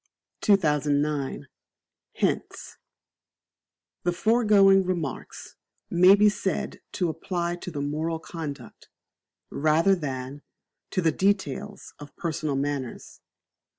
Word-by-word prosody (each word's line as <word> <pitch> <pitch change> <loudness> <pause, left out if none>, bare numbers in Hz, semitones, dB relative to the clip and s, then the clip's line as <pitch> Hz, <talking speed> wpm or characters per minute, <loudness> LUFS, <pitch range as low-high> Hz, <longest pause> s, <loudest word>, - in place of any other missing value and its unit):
2009. 150 - +1 0.7
Hints. - - -2 1.2
The 175 - 0
foregoing 200 -1 +4
Remarks 175 -7 -5 0.3
may 180 +3 +7
be 210 +1 +5
said 200 -2 -2
to 180 - 0
apply 170 +1 -3
to 180 - -7
the 145 -4 -4
moral 155 +3 -2
conduct, 150 -7 -8 0.6
rather 155 +6 +3
than, 140 -4 -4 0.5
to 185 - -1
the 165 - +4
details 200 +2 -2
of 145 -1 -12
personal 155 -3 -2
manners. 140 -2 -4
165 Hz, 95 wpm, -26 LUFS, 145-190 Hz, 1.2 s, may